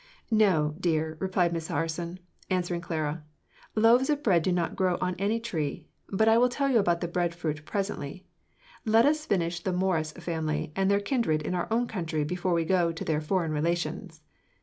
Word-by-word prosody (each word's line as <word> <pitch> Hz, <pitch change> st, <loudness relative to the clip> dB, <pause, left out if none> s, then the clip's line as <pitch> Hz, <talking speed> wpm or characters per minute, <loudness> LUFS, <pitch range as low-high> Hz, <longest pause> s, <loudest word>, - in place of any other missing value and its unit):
"No, 185 Hz, -9 st, +3 dB
dear," 160 Hz, -3 st, 0 dB
replied 185 Hz, -2 st, +1 dB
Miss 165 Hz, -1 st, -3 dB
Harson, 170 Hz, +2 st, -3 dB, 0.3 s
answering 175 Hz, -2 st, -1 dB
Clara; 155 Hz, -2 st, -3 dB, 0.5 s
"loaves 235 Hz, +5 st, +5 dB
of 295 Hz, -1 st, 0 dB
bread 180 Hz, -, +4 dB
do 185 Hz, -, 0 dB
not 175 Hz, -1 st, 0 dB
grow 185 Hz, -2 st, +1 dB
on 180 Hz, 0 st, 0 dB
any 210 Hz, +4 st, +1 dB
tree. 165 Hz, -11 st, -3 dB, 0.2 s
But 220 Hz, +3 st, +2 dB
I 225 Hz, +1 st, +6 dB
will 250 Hz, +1 st, +4 dB
tell 275 Hz, +2 st, 0 dB
you 235 Hz, -, +5 dB
about 175 Hz, -4 st, +1 dB
the 175 Hz, -, -1 dB
bread 170 Hz, 0 st, -1 dB
fruit 155 Hz, -3 st, -3 dB
presently; 190 Hz, -4 st, -4 dB, 0.6 s
let 225 Hz, +1 st, +4 dB
us 305 Hz, +1 st, +1 dB
finish 175 Hz, -3 st, 0 dB
the 185 Hz, +2 st, -2 dB
Morus 180 Hz, -4 st, 0 dB
family 160 Hz, -3 st, -3 dB
and 195 Hz, 0 st, +2 dB
their 200 Hz, 0 st, +4 dB
kindred 200 Hz, -, 0 dB
in 180 Hz, -, -2 dB
our 175 Hz, -1 st, -1 dB
own 235 Hz, +2 st, +2 dB
country 165 Hz, -8 st, -2 dB
before 180 Hz, +3 st, -1 dB
we 165 Hz, -1 st, +1 dB
go 175 Hz, -1 st, +2 dB
to 165 Hz, -, -6 dB
their 155 Hz, -1 st, 0 dB
foreign 165 Hz, +1 st, 0 dB
relations. 165 Hz, +1 st, -2 dB
175 Hz, 190 wpm, -28 LUFS, 160-200 Hz, 0.6 s, I